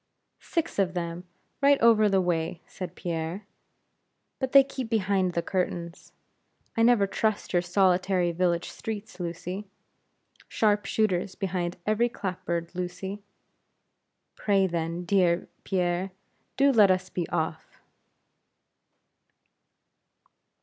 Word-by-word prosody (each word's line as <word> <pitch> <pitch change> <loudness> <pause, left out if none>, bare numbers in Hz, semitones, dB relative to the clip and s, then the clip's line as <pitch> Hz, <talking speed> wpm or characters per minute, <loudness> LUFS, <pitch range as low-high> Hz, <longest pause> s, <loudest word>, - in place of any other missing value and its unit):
"Six 330 - -2
of 185 -2 +1
them, 170 0 -4 0.4
right 280 0 +5
over 220 -2 +5
the 195 -1 +3
way," 165 -1 -1
said 185 - -8
Pierre; 170 +3 -4 0.9
"but 265 -1 -2
they 275 -1 +9
keep 265 -3 -6
behind 195 -4 +1
the 170 - -1
curtains. 175 -2 -3 0.6
I 230 - +1
never 230 -3 +5
trust 215 +1 -1
your 175 - +4
solitary 180 0 +2
village 170 0 0
streets, 215 -3 -6
Lucy. 180 +3 -5 0.8
Sharp 210 -2 +1
shooters 190 -3 0
behind 180 -3 -2
every 215 +3 +2
clap 185 -5 -5
board, 170 0 -2
Lucy." 185 +3 -5 1.1
"Pray, 195 -2 +2
then, 170 0 -2
dear 180 -2 +2 0.2
Pierre, 180 0 0 0.5
do 275 +1 +5
let 215 -6 +6
us 185 0 +1
be 175 -2 -3
off!" 160 0 -3
185 Hz, 115 wpm, -27 LUFS, 175-210 Hz, 1.1 s, they